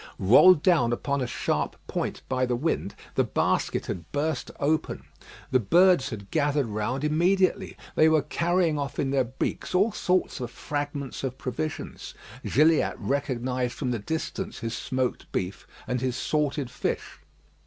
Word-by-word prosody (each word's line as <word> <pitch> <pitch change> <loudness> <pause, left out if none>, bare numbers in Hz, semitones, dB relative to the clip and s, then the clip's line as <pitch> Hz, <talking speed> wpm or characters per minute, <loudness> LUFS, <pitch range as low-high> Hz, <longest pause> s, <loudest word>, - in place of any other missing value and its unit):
Rolled 145 - +7
down 155 -11 +4
upon 140 +3 -1
a 125 - -1
sharp 125 - -1
point - - -3
by 130 -1 0
the 125 - 0
wind, 125 -6 -1 0.2
the - - +2
basket - - 0
had 85 -3 -6
burst 145 0 -1
open. 155 +2 0 0.5
The 130 - +4
birds 170 - +4
had 100 -5 -8
gathered 145 -2 +1
round 110 +5 -2
immediately. 175 +5 +2 0.2
They 155 - +5
were 155 -2 +3
carrying 170 -3 +1
off 140 -1 -4
in 135 - 0
their 135 -2 +2
beaks 130 +8 -3
all 200 +5 +4
sorts 185 -6 0
of 120 -2 -4
fragments 145 +2 -4
of 130 -1 -3
provisions. 80 -14 -5 0.3
Gilliatt 155 +4 +3
recognised 125 -3 -1
from 130 -4 -2
the 120 - -1
distance 160 - -4
his 115 0 -4
smoked 130 +1 -2
beef 90 -1 -3 0.2
and 125 -1 -1
his 130 -2 -1
salted 145 -2 -1
fish. - - -3
140 Hz, 155 wpm, -26 LUFS, 125-160 Hz, 0.5 s, Rolled